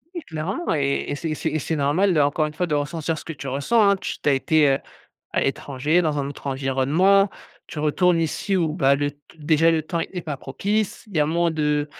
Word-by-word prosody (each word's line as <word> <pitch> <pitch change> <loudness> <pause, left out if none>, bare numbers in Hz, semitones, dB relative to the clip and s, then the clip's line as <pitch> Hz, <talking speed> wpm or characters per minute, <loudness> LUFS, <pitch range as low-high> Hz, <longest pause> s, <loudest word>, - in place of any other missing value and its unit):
Oui, 345 - -3
clairement 165 - -3
et 140 -2 0
et - - -1
c'est 160 +3 -4
et - - -1
c'est 160 - -2
et 155 - -1
c'est 160 - -2
normal 155 +7 +2
de 155 - +2
encore 145 +2 +2
une 150 - -5
fois 180 +3 -1
de 150 - 0
ressentir 150 +2 -2
ce - - -9
que 165 - -5
tu 140 -1 -8
ressens, 145 - +3
hein, 200 - +4
tu - - -4
tu - - +2
as - - +4
été, 150 +2 +3
heu, 135 - +2 0.5
à - - +1
l'étranger, 145 +5 0
dans 150 -3 0
un 140 - -2
autre 145 - -10
environnement. 140 +9 +2 0.4
Tu - - -8
retournes 170 +3 +2
ici 175 +4 -1
où, 165 -4 +1
bah, 140 -5 +3
le 145 +1 -1
t 145 - -25 0.2
déjà 160 +2 +3
le 160 -1 +1
temps 170 +2 -3
est 180 +1 -5
pas 150 -4 -5
propice. 200 +10 -2
Il 200 - -8
y - - +4
a 150 - +3
moins 170 +2 +1
de, 150 -2 0
155 Hz, 250 wpm, -23 LUFS, 145-170 Hz, 0.5 s, hein